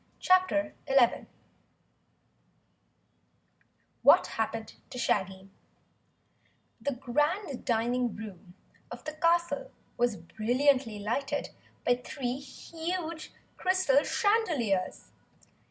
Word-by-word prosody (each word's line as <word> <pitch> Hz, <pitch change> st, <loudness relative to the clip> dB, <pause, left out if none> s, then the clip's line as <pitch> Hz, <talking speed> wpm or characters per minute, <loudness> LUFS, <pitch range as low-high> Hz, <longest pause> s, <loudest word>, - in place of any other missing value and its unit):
CHAPTER 370 Hz, -5 st, +3 dB
11 270 Hz, -4 st, +3 dB, 2.7 s
What -, -, +7 dB
Happened 225 Hz, 0 st, -2 dB, 0.2 s
to -, -, -8 dB
Shaggy 190 Hz, -4 st, -1 dB, 1.3 s
The 285 Hz, -, -1 dB
Grand 290 Hz, -, -1 dB
Dining 240 Hz, 0 st, 0 dB
Room 195 Hz, -4 st, -10 dB, 0.3 s
of -, -, -9 dB
the 310 Hz, -, -5 dB
castle 340 Hz, +2 st, +1 dB, 0.3 s
was 240 Hz, -2 st, +1 dB
brilliantly 240 Hz, -, +1 dB
lighted 230 Hz, +7 st, -2 dB, 0.3 s
by 245 Hz, 0 st, +4 dB
three 255 Hz, -1 st, -3 dB
huge 325 Hz, +3 st, -5 dB, 0.3 s
crystal 370 Hz, -7 st, +3 dB
chandeliers. 315 Hz, -, 0 dB
260 Hz, 80 wpm, -29 LUFS, 225-320 Hz, 2.7 s, What